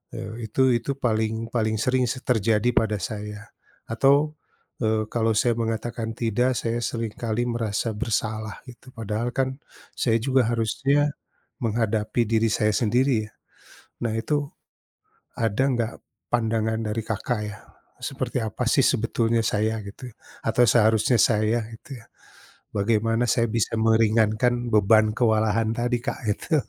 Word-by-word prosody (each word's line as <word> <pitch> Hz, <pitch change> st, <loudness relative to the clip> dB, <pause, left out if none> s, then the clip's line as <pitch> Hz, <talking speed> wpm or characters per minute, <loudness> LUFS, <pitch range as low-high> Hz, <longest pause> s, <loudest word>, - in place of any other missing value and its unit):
eee, 110 Hz, +3 st, -6 dB
itu 130 Hz, +4 st, +3 dB
itu 120 Hz, +4 st, -1 dB
paling 110 Hz, -2 st, -1 dB
paling 110 Hz, -2 st, 0 dB
sering 125 Hz, +1 st, +2 dB
sih 130 Hz, -, -5 dB
terjadi 110 Hz, 0 st, +2 dB
pada 110 Hz, -2 st, +2 dB
saya, 105 Hz, +1 st, -6 dB, 0.4 s
atau, 140 Hz, +6 st, +3 dB, 0.5 s
eee, 110 Hz, 0 st, +1 dB
kalau 115 Hz, -1 st, +1 dB
saya 120 Hz, +1 st, +3 dB
mengatakan 115 Hz, 0 st, -3 dB
tidak 120 Hz, +3 st, +1 dB
saya 115 Hz, 0 st, -1 dB
seringkali 115 Hz, 0 st, -2 dB
merasa 115 Hz, -1 st, -1 dB
bersalah 110 Hz, -1 st, -2 dB
gitu 125 Hz, +2 st, -14 dB
padahal 115 Hz, +2 st, -2 dB
kan 130 Hz, 0 st, 0 dB, 0.4 s
saya 115 Hz, -2 st, +2 dB
juga 130 Hz, -1 st, +2 dB
harusnya, 140 Hz, +6 st, +1 dB, 0.5 s
menghadapi 110 Hz, 0 st, 0 dB
diri 115 Hz, 0 st, +2 dB
saya 105 Hz, 0 st, +2 dB
sendiri 120 Hz, 0 st, +2 dB
ya, -, -, -25 dB, 0.7 s
nah 115 Hz, -2 st, -1 dB
itu, 145 Hz, +5 st, -1 dB, 0.9 s
ada 115 Hz, +3 st, +1 dB
nggak 115 Hz, -2 st, -1 dB, 0.4 s
pandangan 110 Hz, -1 st, 0 dB
dari 110 Hz, +1 st, -2 dB
Kakak 110 Hz, +1 st, -2 dB
ya? 105 Hz, -, -8 dB, 0.4 s
Seperti 130 Hz, -2 st, -3 dB
apa 110 Hz, -, -3 dB
sih -, -, +4 dB
sebetulnya 115 Hz, +1 st, +1 dB
saya 110 Hz, +1 st, 0 dB
gitu 105 Hz, +5 st, -9 dB, 0.4 s
atau 115 Hz, +2 st, +3 dB
seharusnya 110 Hz, +2 st, +4 dB
saya 110 Hz, +1 st, +3 dB
gitu 130 Hz, +4 st, -10 dB
ya, -, -, -20 dB, 0.7 s
bagaimana 115 Hz, +3 st, +1 dB
saya 115 Hz, -, +3 dB
bisa 115 Hz, -1 st, 0 dB
meringankan 115 Hz, +2 st, +2 dB
beban 110 Hz, +1 st, +5 dB
kewalahan 110 Hz, -1 st, +2 dB
tadi 120 Hz, +1 st, 0 dB
Kak -, -, -3 dB
gitu. 155 Hz, +9 st, -1 dB
115 Hz, 135 wpm, -24 LUFS, 110-120 Hz, 0.9 s, beban